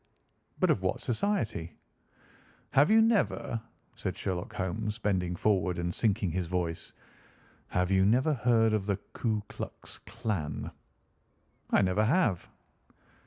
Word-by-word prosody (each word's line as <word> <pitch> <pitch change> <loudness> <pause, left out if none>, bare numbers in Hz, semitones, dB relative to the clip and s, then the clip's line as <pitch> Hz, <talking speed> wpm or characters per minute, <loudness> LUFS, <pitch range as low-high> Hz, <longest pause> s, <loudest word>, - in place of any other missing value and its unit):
"But - - +4
of - - +1
what - - 0
society?" 115 - -1 1.0
"Have 145 +3 +5
you 220 +1 +6
never—" 200 - +1 0.3
said - - -4
Sherlock 90 -1 -3
Holmes, 105 +4 -2
bending 95 -5 0
forward 90 -2 +1
and 85 0 -2
sinking 105 -4 +1
his 90 +1 -2
voice—"have 90 +1 -5
you 95 0 +4
never 125 +9 +3
heard 115 -3 +3
of 105 -2 0
the 100 -2 +1 0.2
Ku 110 -3 -1
Klux - - -8
Klan?" 105 -10 -4 1.0
"I - - +4
never 95 +3 +2
have." 120 - +1
105 Hz, 120 wpm, -30 LUFS, 90-115 Hz, 1.0 s, you